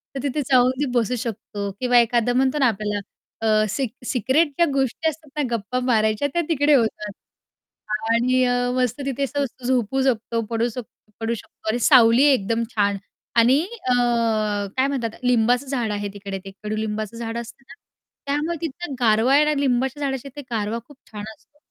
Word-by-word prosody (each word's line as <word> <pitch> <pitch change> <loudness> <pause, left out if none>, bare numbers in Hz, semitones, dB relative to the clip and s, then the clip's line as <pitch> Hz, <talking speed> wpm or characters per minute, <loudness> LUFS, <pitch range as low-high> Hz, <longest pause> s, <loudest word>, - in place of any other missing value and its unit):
तर - - -2
तिथे 285 +1 -1
जाऊन 250 0 +5
ती 290 - +1
बसू 240 +1 +1
शकतो 205 -3 -5
किंवा 245 -1 +3
एखादं 235 +1 +2
म्हणतो 270 +3 +1
ना 260 - +5
आपल्याला 210 -1 -1 0.4
अ, 215 -1 +3
सि 255 +5 -1 0.2
सिक्रेट 265 +7 +2
ज्या 340 - +5
गोष्टी 275 +4 0
असतात 310 -1 -10
ना, - - +2
गप्पा 230 +4 -3
मारायच्या, 220 +3 +2
त्या 345 - +2
तिकडे 295 -1 +3
होतात. 220 -4 0 1.0
आणि 255 +2 +3
अ, 245 - +2 0.2
मस्त 255 +2 0
तिथे 275 0 -2
असं 285 +1 -1
मस्त 260 -1 -5
झोपू 255 +1 +1
शकतो, 230 -2 0
पडू 230 +1 0
शकतो 225 -2 -11
पडू 225 +1 -1
शकतो 220 - -9
आणि 240 +2 0
सावली 245 -1 +6
एकदम 230 +1 0
छान. 200 -1 +2 0.4
आणि 250 +6 +5 0.3
अ, 250 - +4 0.8
काय 265 +1 +3
म्हणतात 255 -5 -2
लिंबाचं 245 +2 +2
झाड 240 -5 -1
आहे 205 0 -2
तिकडे. 200 -1 -6
ते 195 - -7
कडूलिंबाचं 215 +1 -3
झाड 230 0 -4
असतं 235 +3 -8
ना, - - -12 0.5
त्यामुळे 295 +4 -1
तिथं 325 -1 -5
गारवा 230 +3 +3
आहे 300 +1 +5
ना, 300 - +2
लिंबाच्या 265 +1 0
झाडाच्या 270 -1 -3
तिथे 290 - -6
गारवा 220 +1 -1
खूप 290 - -16
छान 210 -1 -7
असतो. 290 - -33
245 Hz, 175 wpm, -22 LUFS, 220-270 Hz, 1.0 s, सावली